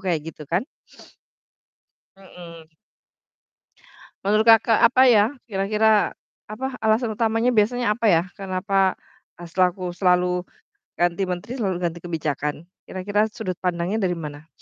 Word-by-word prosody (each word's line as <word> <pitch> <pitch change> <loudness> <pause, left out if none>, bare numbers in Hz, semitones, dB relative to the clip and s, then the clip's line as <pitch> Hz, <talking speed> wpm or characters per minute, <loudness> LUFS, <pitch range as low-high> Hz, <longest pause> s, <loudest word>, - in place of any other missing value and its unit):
kayak 175 -5 -1
gitu 150 -2 -13
kan. 180 +8 0 1.5
Mhm. 170 -4 -14 1.5
Menurut, 215 +3 +2
Kakak, 225 0 +5
apa 250 +2 +5
ya 210 -3 +6 0.2
kira-kira, 210 +1 +1 0.3
apa 215 +5 -5
alasan 220 +1 +1
utamanya 225 +2 +1
biasanya, 230 0 +2
apa 230 +1 -1
ya? 165 -4 +4 0.2
Kenapa, 195 0 0 0.4
eee, 175 - -10
selaku 180 0 0
selalu 180 0 +1 0.5
ganti 175 +2 +1
menteri 180 +5 -5
selalu 195 -7 -1
ganti 170 -1 -2
kebijakan? 150 -4 -3 0.3
Kira-kira 205 +3 -1
sudut 185 -5 -5
pandangnya 180 +3 -2
dari 175 -2 0
mana? 150 -1 -8
190 Hz, 120 wpm, -23 LUFS, 175-215 Hz, 1.5 s, ya